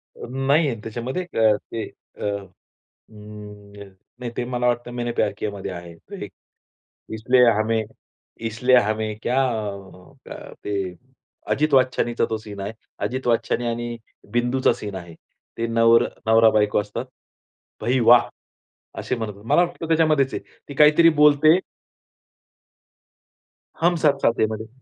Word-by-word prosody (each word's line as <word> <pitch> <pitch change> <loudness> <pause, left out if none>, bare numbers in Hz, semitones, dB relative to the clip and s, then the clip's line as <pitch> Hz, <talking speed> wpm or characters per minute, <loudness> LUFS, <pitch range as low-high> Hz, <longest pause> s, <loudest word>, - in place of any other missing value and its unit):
अ, - - -9
नाहीये 135 +2 +1
त्याच्यामध्ये 120 +10 -4
अ, 110 -11 +2 0.2
ते 115 -1 -3 0.4
अ, - - -6 0.6
अं, 105 -1 -13 0.3
नाही 120 -1 -4
ते 125 - -1
मला 125 0 -2
वाटतं 120 0 0
मैने 120 -1 -2
प्यार - - 0
कियामध्ये 100 -2 -4
आहे. 85 -1 -9
तो - - -14
एक, - - -11 0.8
इसलिये 125 +3 +4
हमे, 110 +1 +1 0.7
इसलिये 125 +3 +3
हमे 110 +1 -2
क्या 125 +2 0 1.3
ते 105 - -4 0.8
अजित 155 +1 +1
वाच्छाणी 130 -2 +2
तो 110 -1 +1
सीन 105 -2 -10
आहे. 100 +3 -5 0.3
अजित 130 0 -3
वाच्छाणी 120 +1 0
आणि 120 0 -3 0.3
बिंदूचा 120 +2 +2
सीन 105 -2 -7
आहे. 85 -2 -8 0.4
ते 115 - -1
नवर 115 0 +4 0.2
नवरा-बायको 110 -2 +4
असतात. 105 +4 -5 0.8
भाई 130 +2 +1
वाह! 120 +1 +6 0.7
असे 125 - -2
म्हणत. 110 -3 -5
मला 145 +9 +4
वाटतं 175 -1 -4
त्याच्यामध्येच 155 -4 +2
आहे. - - -4 0.3
ती 140 - -7
काहीतरी 150 +4 +6
बोलते 150 +3 +6 2.2
हम 175 +1 +3
साथ 140 -2 +4
साथ 115 - +2
है - - +4
मध्ये. 110 0 -6
120 Hz, 130 wpm, -22 LUFS, 110-130 Hz, 2.2 s, वाह